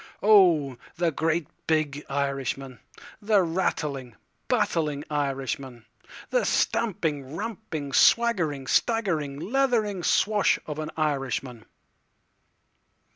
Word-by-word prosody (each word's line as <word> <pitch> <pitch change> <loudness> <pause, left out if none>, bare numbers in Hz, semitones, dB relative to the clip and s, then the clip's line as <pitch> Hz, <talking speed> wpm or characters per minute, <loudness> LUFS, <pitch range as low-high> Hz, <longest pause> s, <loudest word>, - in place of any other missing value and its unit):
Oh, 175 - +5 0.2
the 170 -1 +1
great 160 +1 0 0.2
big 150 -2 0
Irishman, 135 -2 -3 0.4
The 205 -2 +3
rattling, 150 - -2 0.3
battling 150 -3 0
Irishman—The 135 - -4
stamping, 155 - -1
ramping, 165 -9 -5
swaggering, 175 - +3
staggering, 165 - 0
leathering 220 - 0
swash 205 +4 +2
of 150 0 -5
an 155 0 -4
Irishman. 135 -5 -2
155 Hz, 80 wpm, -26 LUFS, 140-195 Hz, 0.4 s, Oh